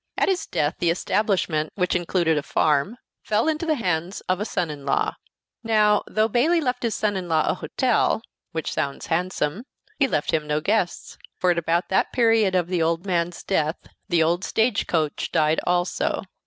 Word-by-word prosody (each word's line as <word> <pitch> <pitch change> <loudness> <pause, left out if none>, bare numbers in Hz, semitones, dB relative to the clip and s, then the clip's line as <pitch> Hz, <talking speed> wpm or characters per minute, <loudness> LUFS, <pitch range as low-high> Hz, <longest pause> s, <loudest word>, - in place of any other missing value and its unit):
At - - +2
his 375 -2 -1
death 145 +1 -1
the 170 - +2
establishment, 175 -4 0
which 180 -2 0
included 175 -2 +1
a 150 - 0
farm, 150 - +1 0.2
fell 215 +6 0
into 315 +1 -1
the 310 - +2
hands 180 - -2
of 185 0 -1
a 210 - -2
son 175 -7 -2
in 145 -2 -9
law. 140 - 0 0.5
Now, 215 -2 +3
though 215 0 +1
Bayley 285 +10 +2
left 250 -5 -1
his 230 -2 -1
son 210 -1 0
in 180 -2 -4
law 160 -1 +2
a - - +2
hotel 245 -3 0 0.3
which 160 -2 -3
sounds 140 -1 -3
handsome 180 +2 -1 0.4
he 275 - +4
left 150 - -1
him 155 -1 0
no 150 0 +1
guests; 190 +2 -1 0.2
for 180 - +2
at 170 - +1
about 170 +2 0
the 190 - +2
period 225 -5 +3
of 180 -2 +2
the 180 -2 -1
old 165 +3 0
man's 175 -2 -1
death 160 -4 0 0.3
the 170 -2 +3
old 170 +3 +1
stage 220 -1 +1
coach 155 -4 -1
died 155 +1 +2
also. 175 0 0
180 Hz, 190 wpm, -24 LUFS, 160-215 Hz, 0.5 s, he